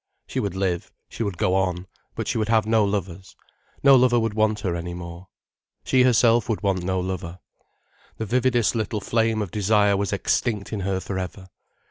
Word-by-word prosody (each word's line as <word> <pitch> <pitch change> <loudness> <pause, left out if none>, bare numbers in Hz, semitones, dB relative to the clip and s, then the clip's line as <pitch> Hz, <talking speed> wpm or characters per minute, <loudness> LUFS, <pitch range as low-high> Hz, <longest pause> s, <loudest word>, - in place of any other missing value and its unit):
She - - -4
would 100 -2 -2
live, 95 -3 -2 0.2
she - - -8
would 100 -6 -2
go 90 - +1
on, 90 -1 0 0.3
but - - -4
she - - -1
would 110 0 -1
have 110 -2 +3
no 110 0 +3
lovers, 95 -2 -3 0.5
no 140 -1 +8
lover 125 -1 +4
would 110 -2 -1
want 110 -1 +1
her 95 -4 -1
any 85 0 -5
more. 85 +1 -9 0.6
She 130 - +3
herself 120 -2 +4
would 110 - -2
want 95 -2 +1
no 95 +1 -1
lover. 90 -1 -4 0.8
The 110 - -3
vividest 120 +1 +2
little 110 -1 -2
flame 110 +1 0
of 95 - -8
desire 105 0 +3
was 100 0 -1
extinct 105 +2 -1
in 105 - -2
her 95 0 -1
for 95 0 -4
ever. 95 +1 -7
100 Hz, 190 wpm, -24 LUFS, 95-110 Hz, 0.8 s, no